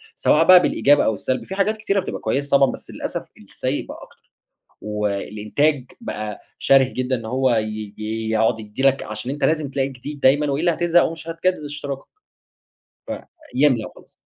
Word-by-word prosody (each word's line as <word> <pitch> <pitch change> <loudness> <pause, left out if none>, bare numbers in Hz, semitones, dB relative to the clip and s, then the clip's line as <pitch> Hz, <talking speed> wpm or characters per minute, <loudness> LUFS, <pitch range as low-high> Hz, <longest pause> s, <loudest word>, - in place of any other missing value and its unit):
سواء 160 +2 +3
بقى 185 -1 +10
بالإيجاب 145 -4 +3
أو 110 - +2
السلب، 130 +5 -2
في 190 - -6
حاجات 210 +2 +1
كتيرة 200 -2 0
بتبقى - - -4
كويسة 140 +1 -1
طبعًا، 135 -1 +4
بس - - -9
للأسف - - -5
السيئ - - -4
بقى - - -9
أكتر، - - -20 0.5
والإنتاج 105 +7 -1 0.2
بقى 105 - -5 0.2
شَرِه 135 -1 +4
جدًا 130 0 0
إن 115 - -8
هو 130 +3 +1
ي 110 -2 -3
ي 110 +1 -3
يقعد 110 0 +2
يدّي 105 +4 -6
لك 135 0 +3
علشان 110 +4 -4
أنت 145 +1 -2
لازم 155 -3 +1
تلاقي 135 0 0
جديد 140 +2 -8
دايمًا، 145 +3 +4
وإلّا 160 +5 +1
هاتزهق 175 +1 +3
أو - - 0
مش 165 0 -10
هتجدد 165 0 -1
اشتراكك. 145 -2 -6 1.5
فيملا 130 -5 +3
وخلاص. - - -18
135 Hz, 175 wpm, -22 LUFS, 110-150 Hz, 1.5 s, بقى